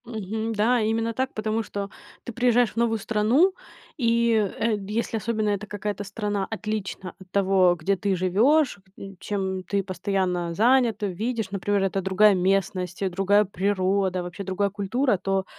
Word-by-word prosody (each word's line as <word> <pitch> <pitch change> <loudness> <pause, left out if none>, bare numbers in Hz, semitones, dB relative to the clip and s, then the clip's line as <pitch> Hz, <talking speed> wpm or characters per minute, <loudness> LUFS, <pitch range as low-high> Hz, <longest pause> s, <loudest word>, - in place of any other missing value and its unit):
Мгм. 220 0 -4
Да, 225 +3 +2
именно 225 +1 0
так, 260 +3 -2
потому 215 +1 -1
что 200 -2 -5 0.3
ты 240 - -7
приезжаешь 245 0 +3
в - - -28
новую 230 -1 +2
страну. 225 - +2 0.4
И, 235 -3 +2 0.3
э, 225 -1 +1
если 225 +2 -2
особенно 215 -1 -1
это 205 +1 -2
какая-то 205 0 -4
страна 205 -1 -3
отлична 210 -4 -4
от 190 -1 -15
того, 190 -2 +3
где 195 +5 +1
ты 195 +1 -1
живешь, 220 - +2 0.4
чем 190 -2 -3
ты 200 +1 -1
постоянно 185 -2 -2
занята. 230 -1 +3
Видишь, 215 +2 -3
например, 200 +1 0
это 195 0 0
другая 190 +3 +4
местность, 185 -1 0
э, 190 - +1
другая 195 +3 +3
природа, 190 -1 0
вообще 180 +3 -7
другая 195 +1 -1
культура, 210 +4 0
то, 195 +1 -1
205 Hz, 155 wpm, -25 LUFS, 190-225 Hz, 0.4 s, другая